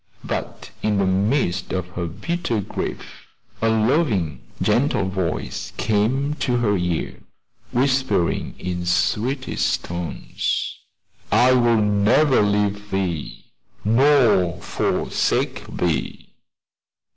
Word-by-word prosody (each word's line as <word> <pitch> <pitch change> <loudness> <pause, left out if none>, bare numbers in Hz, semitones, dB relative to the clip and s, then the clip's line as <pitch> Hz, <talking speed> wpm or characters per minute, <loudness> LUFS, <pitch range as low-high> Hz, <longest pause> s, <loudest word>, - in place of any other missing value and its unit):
But - - -5
in 105 -1 +1
the 100 - +2
midst 95 -1 0
of 95 -1 -2
her 90 -1 -4
bitter 120 - -2
grief 100 - -6 0.3
a 115 - +3
loving, 110 - +1 0.2
gentle 120 -7 +2
voice 95 -3 -3
came 125 +7 +1
to 125 -2 +1
her 110 -4 +2
ear, 90 -3 -2 0.5
whispering 130 -8 +1
in 90 -1 -4
sweetest 125 +9 0
tones, 85 -1 -3 0.6
"I 125 +1 +5
will 120 -2 +4
never 105 +7 +3
leave 105 0 0
thee, 95 -5 -3 0.4
nor 110 - +4
forsake - - -1
thee." 80 -6 -2
105 Hz, 100 wpm, -22 LUFS, 90-125 Hz, 0.6 s, I